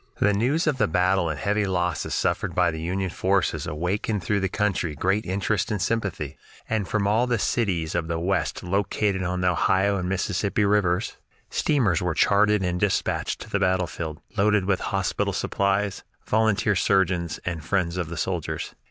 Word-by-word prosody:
The 105 - +3
news 130 - +1
of 150 -5 0
the - - +3
battle 90 +1 +2
and 75 -3 -3
heavy 105 +1 0
losses 90 -2 -1
suffered - - -1
by - - +3
the 80 0 -6
Union 95 +2 -2
forces 95 +2 0
awakened 95 +5 -2
throughout 100 +4 +1
the 95 - 0
country 95 -6 -1
great 95 +8 0
interest 95 +1 0
and 105 - -1
sympathy, 95 -10 -2 0.3
and 110 -4 -1
from 105 -2 0
all 110 +5 +2
the 125 - 0
leading 110 - -1
cities 90 -9 0
of 85 -2 -1
the 85 0 -2
West 90 0 -1
located 100 +1 0
on 90 0 -2
the 90 - +3
Ohio 95 +3 +2
and 90 -1 -2
Mississippi 100 +2 0
Rivers 100 0 +1 0.3
steamers 115 - +2
were 90 -3 -1
chartered 105 0 +3
and 90 -1 -1
dispatched 100 0 0
to - - -9
the 100 - +1
battlefield, 90 -4 -1 0.2
loaded 105 -1 +3
with 95 -1 +1
hospital 100 0 -1
supplies, 100 +1 0 0.2
volunteer 110 -1 +2
surgeons, 90 -3 +1
and 80 -4 -3
friends 90 0 0
of 90 -3 -3
the 85 - -6
soldiers. 90 -1 -3
95 Hz, 180 wpm, -25 LUFS, 90-105 Hz, 0.3 s, The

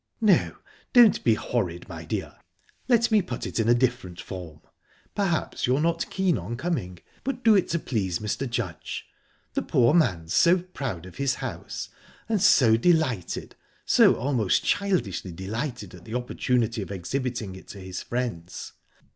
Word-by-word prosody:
"No, 215 -5 +3 0.4
don't 240 -4 +6
be 115 - +4
horride, 90 -7 -2
my - - -8
dear. - - -4 0.5
Let 235 -2 +3
me 215 -2 +5
put 180 - -5
it - - -3
in 115 0 +2
a 120 - +6
different 120 -8 -1
form. 85 -5 -8 0.5
Perhaps 185 -11 -1
you're 130 +3 +2
not 165 +1 0
keen 185 - +1
on 105 +8 -5
coming; 125 - -3 0.3
but 255 -2 -3
do 225 - +7
it 190 - +3
to 170 - 0
please 100 - -1
Mr. 110 +6 -3
Judge. 120 - -4 0.5
The - - 0
poor 120 +3 +3
man's 95 - +2
so 175 +2 +5
proud 135 - -5
of 95 - -12
his 140 -2 +1
house, - - -6 0.4
and 215 -3 0
so 120 - +6
delighted 130 - 0 0.3
so - - +6
almost 125 -7 +1
childishly 180 - 0
delighted 110 - -5
at 90 -1 -12
the 110 - -6
opportunity 120 -2 0
of 95 - -6
exhibiting 110 +2 -3
it 95 - -13
to 100 - -9
his 95 -1 -6
friends. 115 -9 -4
120 Hz, 160 wpm, -26 LUFS, -, 0.5 s, do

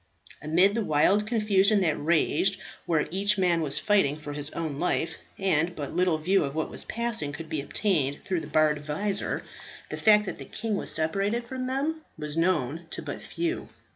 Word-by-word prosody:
Amid 175 +6 +3
the 230 0 0
wild 195 +6 +3
confusion 210 -2 +4
that 160 -5 +2
raged, 170 +5 +1 0.3
where 160 -3 +2
each 200 +3 +2
man 175 -3 +2
was 145 -3 +1
fighting 195 -9 +2
for 150 -1 -7
his 145 0 -1
own 155 -4 -4
life, 175 -2 -1 0.2
and 175 -3 +1
but 145 -2 -5
little 180 -1 +2
view 185 +5 +2
of 140 0 -4
what 160 - -2
was - - -1
passing 230 -10 0
could 160 +2 -8
be 155 -3 -2
obtained 145 -3 -1
through 185 -3 -1
the - - -8
barred 150 -1 +2
visor, 195 +7 -1 0.5
the - - -5
fact 210 -1 +5
that - - -6
the - - -7
king 220 -1 -3
was - - -1
separated 200 +9 0
from 255 0 -4
them 290 +5 -2 0.2
was 150 0 -4
known 165 -2 0
to - - -3
but - - -6
few. 340 +1 -3
180 Hz, 190 wpm, -27 LUFS, 155-210 Hz, 0.5 s, fact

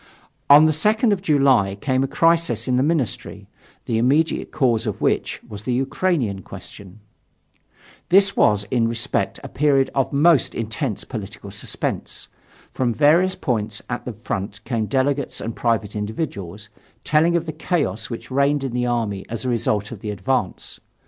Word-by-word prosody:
On 145 +2 +9
the 155 - +4
2nd 210 - +3
of 190 - -3
July 135 - +3
came 130 +1 +1
a - - 0
crisis 165 +2 +2
in 125 - +2
the 125 - +3
ministry, 145 -4 -2 0.4
the 115 -1 0
immediate 145 +7 +1
cause 120 -6 +1
of - - -3
which - - 0
was 100 -1 -8
the 120 +4 -2
Ukrainian 130 - 0
question. 100 +2 -11 1.1
This 195 +2 +5
was 105 -1 +3
in 120 -3 +2
every - - +1
respect 115 0 -2
a - - -5
period 140 -2 +2
of 135 -2 0
most 150 0 +3
intense 115 +1 -3
political 105 -3 -8
suspense. 100 - -4 0.4
From 120 -3 0
various 170 +6 +4
points 110 -4 -2
at 125 - -4
the 125 - -4
front 105 0 -5
came 115 -3 -2
delegates 140 +2 0
and 115 - -5
private 110 -4 -1
individuals, 105 - -5 0.3
telling 160 +3 +3
of 170 -1 0
the 155 - -5
chaos 145 - -2
which 115 +2 -7
reigned 140 +1 +2
in 135 - -3
the 125 0 0
army 110 -5 -1
as 115 +2 -5
a - - 0
result 105 -3 -1
of 115 - -7
the 105 - -6
advance. 105 0 -2
125 Hz, 165 wpm, -22 LUFS, 110-150 Hz, 1.1 s, On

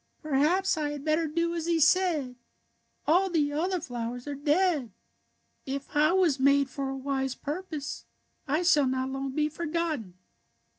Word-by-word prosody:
" - - -43
Perhaps 325 +6 +2
I 295 -1 -1
had 290 0 -6
better 315 +1 +2
do 335 +2 -1
as 335 -1 -3
he 335 -1 +2
said. 320 -6 +2 0.7
All 365 +5 +3
the 300 -4 +1
other 360 +5 0
flowers 245 -4 -5
are 290 - -4
dead. 295 - +1 0.8
If 275 +1 -5
I 305 +2 +4
was 350 -7 +3
made 280 0 +3
for 275 -1 -3
a 270 - -4
wise 265 -1 -2
purpose 310 -2 -5 0.4
I 305 +5 +1
shall 300 -6 +4
not 260 0 -1
long 270 0 -3
be 300 0 +2
forgot 335 0 -2
ten." 185 -5 -12
300 Hz, 165 wpm, -28 LUFS, 270-335 Hz, 0.8 s, I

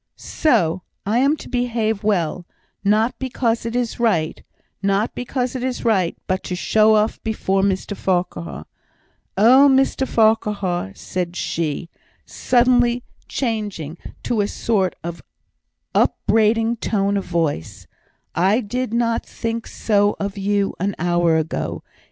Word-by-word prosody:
"So! 180 - +1 0.2
I 215 +4 +2
am 280 +4 +3
to - - -10
behave 230 -4 -1
well, 180 -4 0 0.4
not 215 +4 +2
because 235 -3 -1
it 230 - -4
is 245 -2 -1
right 180 -10 +1 0.4
not 200 +2 +1
because 250 0 -3
it 255 - -3
is 255 -1 -3
right 190 -7 +2
but 185 0 -1
to 180 - -3
show 215 +4 +4
off 215 +1 +1
before 195 -3 0
Mr 195 +1 -1
Farquhar. 85 - -2 0.7
Oh, 255 +7 +7
Mr 265 0 +2
Farquhar!" 205 - +1
said 180 -1 -4
she, 165 -2 -2 0.4
suddenly 245 -1 +2 0.2
changing 210 - -3 0.3
to 230 -3 0
a 200 - 0
sort 200 -4 0
of 170 0 -6 0.7
upbraiding 225 +1 +2
tone 200 -2 0
of 200 - -1
voice, 165 - -2 0.5
"I 195 +6 +3
did 245 +1 -3
not 230 -1 +1
think 230 0 -4
so 205 -1 +1
of 200 0 -3
you 200 0 0
an 200 +3 -1
hour 175 -2 +2
ago. 160 0 -3
210 Hz, 130 wpm, -21 LUFS, 185-235 Hz, 0.7 s, Oh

